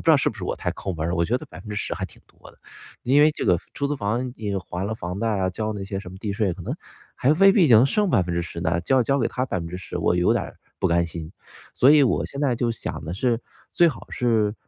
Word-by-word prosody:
知 - - +3
道， 155 - +7
是 140 - +1
不 110 - -13
是 95 - -5
我 - - -2
太 - - -2
抠 95 - -5
门 80 0 -2
儿 - - -1
了， - - 0
我 85 - +2
觉 120 +6 +1
得 - - -7
10% 105 -2 -6
还 - - -4
挺 - - -19
多 - - -17
的。 - - -24 0.5
因 135 +4 +4
为 150 +1 +6
这 - - -5
个 90 - +4 0.2
出 140 - -1
租 145 - -1
房， 120 +3 -2
你 105 -5 -4
还 90 +1 -4
了 110 - -2
房 90 -2 -5
贷 115 - 0
啊， 95 0 +1
交 110 +3 -3
那 100 - -5
些 95 0 -4
什 90 - -10
么 95 - -10
地 105 -1 -3
税， 100 -4 0
可 90 - -9
能 - - -3 0.4
还 140 +4 +3
未 195 +4 +6
必 185 -8 +4
能 115 0 +7
剩 205 +9 +2
10% 85 - 0
呢， 85 +1 +1
交 130 +8 +3
交 140 +4 +1
给 120 - +1
它 130 - -2
10%， 90 -5 -5
我 90 - +2
有 90 - +3
点 - - +1
儿 - - -9 0.2
不 - - +1
甘 85 0 +2
心。 80 0 -7 0.4
所 130 - +5
以 150 -1 +7
我 130 - +2
现 140 - -7
在 135 -4 +2
就 120 -1 0
想 115 -8 -5
的 80 - -5
是， 115 +3 0 0.3
最 175 - +5
好 130 - -7
是， 110 -4 +1
105 Hz, 280 characters per minute, -24 LUFS, 90-130 Hz, 0.5 s, 道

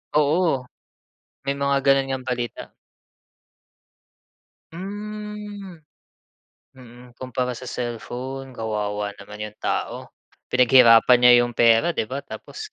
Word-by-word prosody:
Oo, 150 -2 +2 0.8
may 140 0 -1
mga 140 0 +1
ganun 135 -1 +3
ngang 130 -1 -4
balita. 120 -2 -4 2.0
Mm. 205 -1 -7 0.9
Mm, 125 -1 -15
kumpara 130 -1 -3
sa 125 +1 -8
cellphone. 125 +2 -6
Kawawa 105 -2 -3
naman 105 +1 -9
'yong 105 0 -10
tao. - - -3 0.4
Pinaghirapan 125 -1 +6
niya 125 0 +8
'yong 120 - -5
pera, 115 +8 +4
'di 110 - -3
ba, 140 +2 -5
tapos 430 - -9
130 Hz, 105 wpm, -23 LUFS, 120-145 Hz, 2.0 s, niya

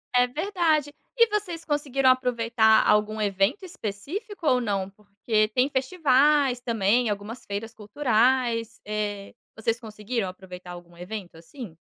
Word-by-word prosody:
É 250 0 +5
verdade. 310 -1 0 0.2
E 465 -1 +6
vocês 365 -6 -3
conseguiram 275 -3 +1
aproveitar 230 -3 +3
algum 210 +1 +2
evento 200 - 0
específico 350 - -6
ou 250 -1 +4
não? 195 -4 -2
Porque 210 +2 -1
tem 250 +4 +2
festivais 275 -2 +2
também, 230 0 +1
algumas 205 +4 -5
feiras 215 +3 -5
culturais. 230 0 +1
Eh, 205 -1 -4 0.2
vocês 225 +1 -1
conseguiram 215 -1 -4
aproveitar 180 -1 -11
algum 175 -1 -12
evento, 180 0 -8
assim? 170 - -10
230 Hz, 125 wpm, -25 LUFS, 205-270 Hz, 0.2 s, E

